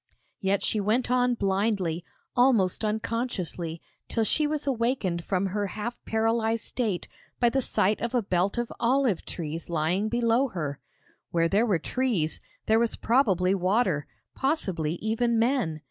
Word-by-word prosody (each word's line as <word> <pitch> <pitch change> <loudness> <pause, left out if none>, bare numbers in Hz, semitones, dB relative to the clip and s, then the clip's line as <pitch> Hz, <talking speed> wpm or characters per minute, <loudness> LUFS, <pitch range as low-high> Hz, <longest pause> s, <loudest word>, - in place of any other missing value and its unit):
Yet 195 0 +1
she 215 - +1
went 220 +5 +1
on 250 -1 +3
blindly, 195 -4 0 0.3
almost 235 -7 +3
unconsciously, 210 -7 -2 0.3
till 225 - +1
she 300 +7 +1
was 300 -1 -2
awakened 230 -9 0
from 195 0 0
her 200 +1 -1
half 215 +4 -5
paralysed 225 0 +1
state 215 -8 -2 0.3
by 240 - +4
the 270 +3 +1
sight 210 -3 +1
of 235 +2 -2
a 240 - +2
belt 190 +2 0
of 240 -1 -2
olive 245 -5 +2
trees 165 0 -5
lying 170 +6 0
below 240 +3 +2
her. 150 - -4 0.5
Where 165 -1 +2
there 210 +6 +3
were 195 -6 +3
trees, 200 - -1 0.2
there 220 +1 +4
was 235 -1 +1
probably 195 -7 +2
water; 185 - +1 0.3
possibly, 190 - 0
even 225 +4 0
men! 225 - +1
215 Hz, 145 wpm, -27 LUFS, 180-240 Hz, 0.5 s, by